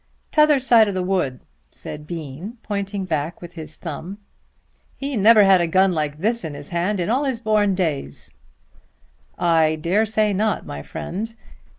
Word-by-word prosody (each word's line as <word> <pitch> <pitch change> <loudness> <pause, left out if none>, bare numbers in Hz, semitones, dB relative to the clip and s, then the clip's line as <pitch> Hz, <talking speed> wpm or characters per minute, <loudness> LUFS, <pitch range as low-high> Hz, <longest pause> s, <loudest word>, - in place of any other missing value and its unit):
"Tother 300 -1 +5
side 235 -4 +5
of 200 - -3
the 185 - -1
wood," 180 -9 -1 0.3
said 150 - -8
Bean 165 - -7
pointing 200 -1 -3
back 160 -1 -2
with 175 0 -10
his 155 -2 -8
thumb. 170 +4 -7 0.8
"He 275 0 -3
never 215 0 +6
had 190 -2 +5
a 170 - +1
gun 190 +3 +3
like 150 -2 -2
this 225 +7 -1
in 155 -3 -5
his 145 0 -10
hand 180 +4 -1
in 175 - -1
all 260 +6 +1
his 260 -4 -1
born 210 -4 +2
days." 150 - -3 1.1
"I 160 -2 +3
dare 180 +8 +1
say 215 -1 +1
not, 210 +1 0
my 70 - -6
friend. 220 - -6
185 Hz, 170 wpm, -22 LUFS, 160-215 Hz, 1.1 s, never